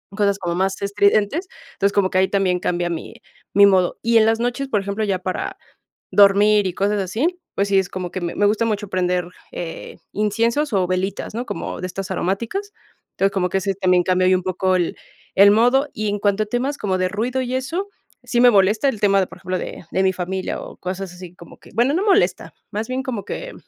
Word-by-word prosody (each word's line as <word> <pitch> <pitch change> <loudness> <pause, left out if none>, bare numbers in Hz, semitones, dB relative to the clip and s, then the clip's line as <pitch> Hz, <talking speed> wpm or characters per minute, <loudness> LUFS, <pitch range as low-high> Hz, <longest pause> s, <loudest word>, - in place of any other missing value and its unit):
cosas 200 -1 +1
como 170 -2 -2
más 190 +2 -1
estridentes. 205 - +1 0.3
Entonces, 200 +1 0
como 195 -2 +2
que 185 - 0
ahí 190 - +3
también 190 -3 +1
cambia 175 0 -1
mi 165 -2 -6 0.4
mi 200 0 +7
modo. 185 -2 +2
Y 230 0 +4
en 220 - +5
las 225 0 +2
noches, 245 +3 -1
por 210 -6 0
ejemplo, 200 +2 -3
ya 195 -3 0
para 185 0 -4 0.5
dormir 205 +1 +5
y 180 - -3
cosas 205 +2 0
así, 255 - -1 0.2
pues 200 0 +1
sí, 195 - +2
es 190 - -2
como 180 -1 -5
que 185 - -4
me 170 - -3
me 205 - +2
gusta 215 +3 +2
mucho 210 -2 -2
prender, 180 -1 0 0.2
eh, 165 -2 -7 0.2
inciensos 230 +6 0
o 185 -2 +2
velitas, 185 +3 -2
¿no?, 245 +2 -3
como - - -5
de 185 - -3
estas 190 +1 -6
aromáticas. 230 - -2 0.4
Entonces, 195 0 +1
como 180 -2 0
que 195 - 0
ese 195 0 -1
también 180 -2 +2
cambia 185 0 +2
ahí 185 - +5
un 180 - -2
poco 185 0 0
el 175 -2 0 0.4
el 200 +1 +7
modo, 245 +7 +3
y 215 -1 -2
en 205 0 -2
cuanto 205 +1 +1
a - - -7
temas 250 +6 -2
como 190 -6 -1
de 185 0 +1
ruido 240 +6 -2
y 250 0 -3
eso, 335 +10 -3 0.3
sí 240 - +1
me 245 - +8
molesta 210 +6 +3
el 220 -6 -4
tema 195 -1 +4
de, 185 - -1
por - - -13
ejemplo, 185 0 -3
de - - -7
de 190 - +1
mi 190 - +3
familia 185 +1 -3
o - - -10
cosas 185 0 -5
así 180 -1 -11
como 170 - -14
que, - - -17
bueno, 245 +5 +3
no 365 - +1
molesta, 410 0 +2 0.2
más 215 +1 -3
bien 255 +1 -2
como 235 -6 -4
que - - -6
200 Hz, 230 wpm, -21 LUFS, 185-225 Hz, 0.5 s, me